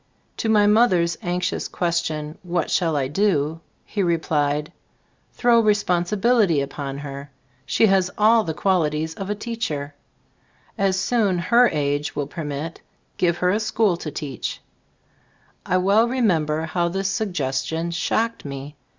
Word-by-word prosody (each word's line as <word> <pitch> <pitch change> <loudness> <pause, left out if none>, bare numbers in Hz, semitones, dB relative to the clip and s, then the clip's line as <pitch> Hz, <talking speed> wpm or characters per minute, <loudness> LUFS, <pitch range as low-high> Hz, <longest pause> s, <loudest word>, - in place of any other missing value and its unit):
To 225 - -1
my 210 -2 +5
mother's 195 -6 +3
anxious 180 0 -2
question, 160 -3 -2
"what 175 -1 -2
shall 165 -4 +1
I 135 -2 0
do 160 -2 0
?" - - -42
he 205 - -3
replied, 150 -4 0 0.6
"Throw 240 -1 +4
responsibil 210 +2 +2
ity 165 -7 +2
upon 140 0 -4
her. 140 0 -7 0.4
She - - +3
has 190 -3 +3
all 220 +1 +5
the 160 -4 -4
quali 185 -6 +2
ties 155 +2 -3
of 195 +3 -6
a 210 - 0
teacher. 205 -11 -4 0.8
As 195 -3 +1
soon 205 -4 +1
2£ - - -2
her 240 +1 +6
age 145 -1 -1
will 145 - -1
permit, 150 +1 -6 0.4
give 170 -2 +1
her 180 - +4
a 210 - +1
school 215 -3 +1
to 165 - -5
teach." 145 -2 -5 1.1
I 185 - +2
well 200 +5 +3
remember 165 -11 +1
how 170 +1 0
this 195 +2 -2
suggestion 165 -5 -2
shocked 225 +7 -1
me. 140 +1 -7
175 Hz, 150 wpm, -22 LUFS, 150-205 Hz, 1.1 s, her